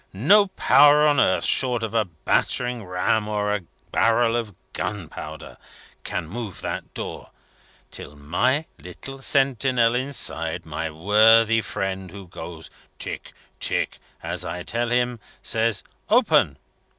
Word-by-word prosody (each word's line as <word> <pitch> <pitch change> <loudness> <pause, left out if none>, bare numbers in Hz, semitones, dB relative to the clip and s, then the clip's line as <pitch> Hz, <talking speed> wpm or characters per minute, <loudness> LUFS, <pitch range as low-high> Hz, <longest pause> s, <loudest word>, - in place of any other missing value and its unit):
No 200 - +5
power 150 -5 +5
on 145 -2 +3
earth, 95 - +3
short 125 -3 +2
of 110 -1 -3
a 110 -2 +2
battering 120 +8 -1
ram 90 +4 0
or 105 -1 -1
a 105 - 0 0.3
barrel 115 0 +3
of 110 -5 -3 0.2
gunpowder, 100 -6 -6 0.5
can 85 - -4
move 105 +1 -6
that - - -5
door, - - -6 0.6
till 75 - -7
my 110 - 0
little 135 0 -9
sentinel 130 -3 +3
inside 90 -11 0
my 80 +1 -4
worthy 110 +7 +4
friend 95 -3 -4
who 95 +1 -11
goes 85 -2 -9 0.3
'Tick, - - -6 0.3
Tick,' - - -1 0.2
as 85 +2 -2
I 90 0 -5
tell 120 +4 -2
him 120 -1 0 0.2
says, 115 -2 +1 0.3
'Open!' 160 - +3
110 Hz, 125 wpm, -23 LUFS, 90-125 Hz, 0.6 s, No